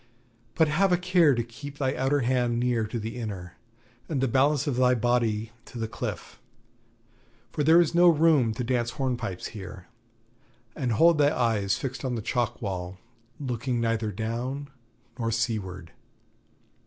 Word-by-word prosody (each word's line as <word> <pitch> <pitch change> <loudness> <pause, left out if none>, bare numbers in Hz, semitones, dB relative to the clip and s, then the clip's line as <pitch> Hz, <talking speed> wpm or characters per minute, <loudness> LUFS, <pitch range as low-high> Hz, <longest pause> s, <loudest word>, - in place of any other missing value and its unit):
But 160 - +4
have 180 +6 +2
a 180 - +4
care 175 -5 +4
to 120 - 0
keep 140 +5 -10
thy 130 -2 0
outer 135 +3 +1
hand 120 -1 +1
near 120 -3 0
to 115 - -4
the 110 +2 -5
inner, 95 -7 -6 0.6
and 150 -5 -1
the 135 - +2
balance 140 +3 +2
of 140 -5 -1
thy 125 0 +4
body 115 -2 0
to - - -11
the 115 -1 -2
cliff, 110 - -6 1.1
for 150 - -1
there 160 +3 +6
is 170 -2 +2
no 175 +1 +6
room 155 -7 +4
to 125 - -3
dance 120 -1 0
hornpipes 120 -9 -3
here. 95 -3 -9 0.9
And 125 -4 -1
hold 165 +6 +5
thy 145 0 +5
eyes 105 -5 +1
fixed 135 0 -5
on 130 -2 -1
the 110 - -4
chalk 120 -1 -1
wall, 90 -2 -4 0.4
looking 125 -2 -2
neither 115 -2 0
down 120 +7 -4 0.5
nor 115 -1 0
seaward.' 105 -7 -3
120 Hz, 160 wpm, -27 LUFS, 110-140 Hz, 1.1 s, there